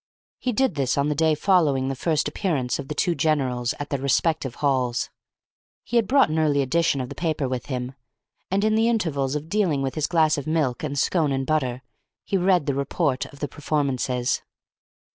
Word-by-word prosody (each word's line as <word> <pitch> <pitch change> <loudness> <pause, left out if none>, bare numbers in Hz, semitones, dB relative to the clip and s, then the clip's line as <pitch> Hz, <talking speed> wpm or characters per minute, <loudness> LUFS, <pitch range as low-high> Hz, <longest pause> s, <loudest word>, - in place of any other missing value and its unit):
He 255 - -1
did 260 0 +1
this 135 -3 0
on 140 +1 +2
the - - +1
day 160 +1 +2
following 150 -7 +2
the 135 - -2
first 155 +3 0
appearance 150 -6 -1
of 140 - -6
the 150 - -5
two 175 - +1
generals 130 -7 0
at 145 - -6
their 140 - 0
respective 140 -1 +1
halls. 130 -4 0 0.7
He 240 - -1
had 225 -4 +2
brought 275 +3 +4
an 155 +1 0
early 145 -3 +2
edition 150 0 +1
of 125 - -5
the - - -6
paper 155 -5 -1
with 125 -1 -4
him, 125 -1 -4 0.6
and 195 +2 +1
in 215 0 +3
the 225 +1 +3
intervals 150 - 0
of 150 +1 -4
dealing 170 -7 +1
with 135 - -2
his 155 -2 -1
glass 160 -3 +3
of 140 - -8
milk 155 -6 0
and 145 -2 -3
scone 155 0 +1
and 135 0 -1
butter, 130 -5 -1 0.4
he - - -2
read 180 -4 +3
the 140 - 0
report 140 0 -1
of 140 - -16
the 145 - -1
performances. 135 -4 -1
145 Hz, 200 wpm, -24 LUFS, 135-165 Hz, 0.7 s, brought